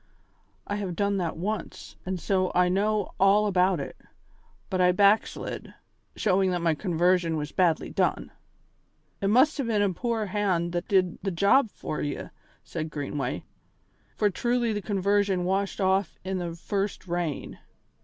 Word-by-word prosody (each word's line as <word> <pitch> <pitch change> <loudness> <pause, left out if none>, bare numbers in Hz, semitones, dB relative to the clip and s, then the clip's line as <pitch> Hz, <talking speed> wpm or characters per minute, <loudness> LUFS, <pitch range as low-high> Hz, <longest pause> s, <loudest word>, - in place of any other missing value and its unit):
I 205 - -3
have 190 -4 -3
done 200 +2 +1
that 170 -4 -2
once, 200 +2 -5
and 185 -1 -2
so 185 0 +1
I 180 0 +4
know 205 +2 +1
all 195 +2 +5
about 185 -3 +2
it; 140 - -6 0.7
but 185 -1 -1
I 180 0 +5
backslid, 200 +3 +1 0.4
showing 190 -2 +2
that 180 -1 -1
my 165 -1 +3
conversion 175 -1 +1
was 150 -1 -4
badly 175 -4 +1
done." - - 0 0.9
"It 195 - +1
must 255 +9 +4
hae 275 - 0
been 220 -4 +1
a 195 -2 +1
poor 230 +2 -1
hand 185 -4 0
that 175 +1 -3
did 185 -3 +2
the 195 - -1
job 200 +8 +3
for 155 - -5
ye," 145 -1 -4 0.3
said 155 -1 -5
Greenway, 145 -1 -3 0.7
"for 210 -2 +2
truly 240 +2 0
the 205 - -2
conversion 200 -1 +1
washed 195 +2 -1
off 190 -1 +1
in 190 0 -2
the 170 -2 -4
first 195 +3 -3
rain." 170 -4 -3
190 Hz, 155 wpm, -27 LUFS, 175-205 Hz, 0.9 s, all